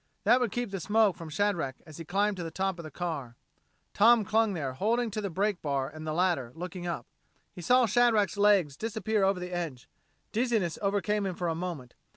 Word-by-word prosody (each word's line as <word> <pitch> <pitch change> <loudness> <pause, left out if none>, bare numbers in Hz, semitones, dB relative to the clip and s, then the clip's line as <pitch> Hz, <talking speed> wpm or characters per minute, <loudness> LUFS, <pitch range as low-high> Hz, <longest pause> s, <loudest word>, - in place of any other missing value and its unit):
That 235 +5 +5
would 245 -5 0
keep 240 -4 -3
the 195 - -3
smoke 210 +1 +3
from 165 -2 -9
Shadrack 165 -5 0
as 155 -3 -12
he 165 - -7
climbed 200 +4 +1
to 175 - -4
the 165 - -4
top 190 +2 -2
of - - -6
the 155 - -7
car. 150 -9 -5 0.6
Tom 225 0 +5
clung 220 0 +2
there, 140 -6 -3
holding 225 - 0
to 215 - -3
the 200 - -3
brake 195 +2 -1
bar 140 -3 -1
and 155 0 -9
the - - -1
ladder, 170 -8 +1
looking 175 +1 -6
up. 170 - -3 0.5
He 180 - -9
saw 250 +8 +4
Shadrack's 225 -2 +3
legs 200 -8 +3
disappear 220 +1 -1
over 195 -1 +2
the 180 0 -6
edge. 160 -8 -4 0.4
Dizziness 225 -7 0
overcame 205 0 0
him 185 - -3
for 175 -1 -2
a - - 0
moment. 160 -7 -5
190 Hz, 210 wpm, -29 LUFS, 165-210 Hz, 0.6 s, That